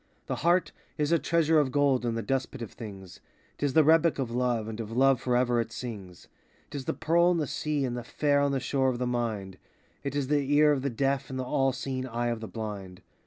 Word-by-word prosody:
The -, -, -3 dB
heart 175 Hz, +3 st, +2 dB, 0.3 s
is 150 Hz, 0 st, 0 dB
a 170 Hz, -, +4 dB
treasure 165 Hz, -1 st, +3 dB
of 140 Hz, -3 st, +1 dB
gold 135 Hz, -3 st, +2 dB
in 115 Hz, -, -1 dB
the 115 Hz, -, -2 dB
dust 135 Hz, -1 st, -1 dB
pit 130 Hz, -4 st, -7 dB
of 110 Hz, -, -8 dB
things; 95 Hz, -5 st, -10 dB, 0.4 s
'T 145 Hz, -, +1 dB
is 135 Hz, -, -3 dB
the 160 Hz, -, +6 dB
rebec 165 Hz, +2 st, +4 dB
of 130 Hz, -4 st, -2 dB
love 120 Hz, -2 st, 0 dB
and 110 Hz, 0 st, -6 dB
of 110 Hz, -1 st, -5 dB
love 135 Hz, +1 st, +3 dB
forever 125 Hz, -1 st, +2 dB
it 115 Hz, 0 st, -6 dB
sings; 100 Hz, -8 st, -8 dB, 0.4 s
'T -, -, -4 dB
is 130 Hz, -, -8 dB
the -, -, -2 dB
pearl 170 Hz, +2 st, +3 dB
in 180 Hz, -, +2 dB
the 155 Hz, -, 0 dB
sea 150 Hz, 0 st, -1 dB
and 120 Hz, -1 st, -3 dB
the 120 Hz, -, -5 dB
phare 145 Hz, +3 st, +1 dB
on 140 Hz, 0 st, +2 dB
the 135 Hz, -, 0 dB
shore 135 Hz, 0 st, +1 dB
of 125 Hz, -, -2 dB
the 125 Hz, -, -1 dB
Mind; 110 Hz, -6 st, -3 dB, 0.4 s
'T 140 Hz, 0 st, -3 dB
is 140 Hz, -2 st, -1 dB
the 145 Hz, -1 st, +1 dB
ear 150 Hz, 0 st, +6 dB
of 140 Hz, -3 st, +1 dB
the 140 Hz, -, -1 dB
deaf 135 Hz, +2 st, -1 dB
and 130 Hz, -, -5 dB
the 130 Hz, -, -2 dB
all 135 Hz, +1 st, +1 dB
seeing 130 Hz, 0 st, -4 dB
eye 120 Hz, 0 st, -2 dB
of 115 Hz, -1 st, -2 dB
the 110 Hz, -, -6 dB
blind. 100 Hz, -5 st, -7 dB
130 Hz, 255 wpm, -28 LUFS, 115-145 Hz, 0.4 s, the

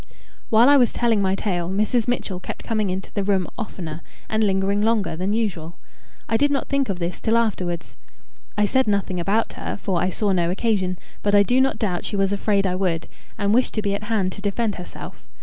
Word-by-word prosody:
While 230 Hz, +3 st, +6 dB
I 285 Hz, 0 st, +7 dB
was 245 Hz, -3 st, +4 dB
telling 230 Hz, -3 st, +2 dB
my 190 Hz, 0 st, +2 dB
tale, 180 Hz, -4 st, -2 dB
Mrs. 215 Hz, +4 st, +1 dB
Mitchell 205 Hz, -6 st, -1 dB
kept -, -, -7 dB
coming 215 Hz, -3 st, 0 dB
into 185 Hz, +1 st, -4 dB
the 200 Hz, -, -1 dB
room 195 Hz, -2 st, +1 dB
oftener, 170 Hz, -8 st, -6 dB, 0.3 s
and 220 Hz, 0 st, +1 dB
lingering 195 Hz, 0 st, +1 dB
longer, 210 Hz, -6 st, +1 dB
than 185 Hz, +4 st, -1 dB
usual. 180 Hz, -7 st, -2 dB, 0.5 s
I 225 Hz, -, +2 dB
did 285 Hz, +5 st, +3 dB
not 280 Hz, -1 st, -1 dB
think 275 Hz, -3 st, 0 dB
of 195 Hz, -, -1 dB
this 175 Hz, 0 st, -3 dB
till 225 Hz, +1 st, +2 dB
afterwards. 180 Hz, -7 st, -1 dB, 0.6 s
I 210 Hz, -, +4 dB
said 260 Hz, +4 st, +2 dB
nothing 200 Hz, -3 st, 0 dB
about 200 Hz, +6 st, 0 dB
her, -, -, -5 dB
for 185 Hz, -4 st, -1 dB
I 185 Hz, -, +1 dB
saw 205 Hz, +2 st, 0 dB
no 175 Hz, -2 st, +2 dB
occasion; 185 Hz, -2 st, 0 dB, 0.2 s
but 205 Hz, 0 st, +2 dB
I 200 Hz, -, +7 dB
do 250 Hz, +5 st, +3 dB
not 270 Hz, -4 st, +1 dB
doubt 195 Hz, -6 st, -1 dB
she -, -, -3 dB
was 195 Hz, 0 st, +1 dB
afraid 200 Hz, 0 st, +1 dB
I 185 Hz, -, +1 dB
would, 180 Hz, -3 st, -1 dB, 0.3 s
and 200 Hz, 0 st, +1 dB
wished 250 Hz, +2 st, +2 dB
to 215 Hz, -, -1 dB
be 200 Hz, -1 st, 0 dB
at 200 Hz, +1 st, -4 dB
hand 210 Hz, -4 st, 0 dB
to 200 Hz, -, -8 dB
defend 210 Hz, +2 st, 0 dB
herself. 180 Hz, -, -9 dB
200 Hz, 220 wpm, -23 LUFS, 185-220 Hz, 0.6 s, I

